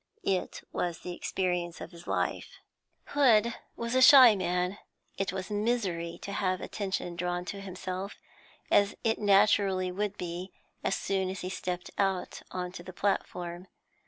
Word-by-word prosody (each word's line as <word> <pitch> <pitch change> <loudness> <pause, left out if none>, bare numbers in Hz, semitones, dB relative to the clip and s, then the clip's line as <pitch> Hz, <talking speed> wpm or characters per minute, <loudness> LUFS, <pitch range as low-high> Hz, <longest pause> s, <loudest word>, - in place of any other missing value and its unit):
It 185 -2 -1
was 175 -2 -2
the 180 - -5
experience 175 -1 -2
of - - -8
his 170 0 -13
life. - - -2 0.5
Hood 235 -5 +4 0.2
was 235 +1 -3
a 260 - +4
shy 260 -4 +10
man; 180 +1 -1 0.4
it 195 0 0
was 190 +1 -5
misery 205 -6 -1
to 200 - -5
have 185 -2 0
attention 190 -3 -3
drawn 175 +1 -2
to 200 +1 -5
himself 190 +1 -5 0.6
as 200 0 +4
it 225 -1 +1
naturally 195 -2 +4
would 205 +2 -2
be 180 +2 -5 0.3
as 195 - +1
soon 190 -1 -1
as 190 0 -5
he 185 - -4
stepped 180 -1 -4
out 195 -2 0
on 180 -1 -4
to 180 - -8
the 185 +2 -10
platform. 180 -2 -2
190 Hz, 155 wpm, -30 LUFS, 180-205 Hz, 0.6 s, shy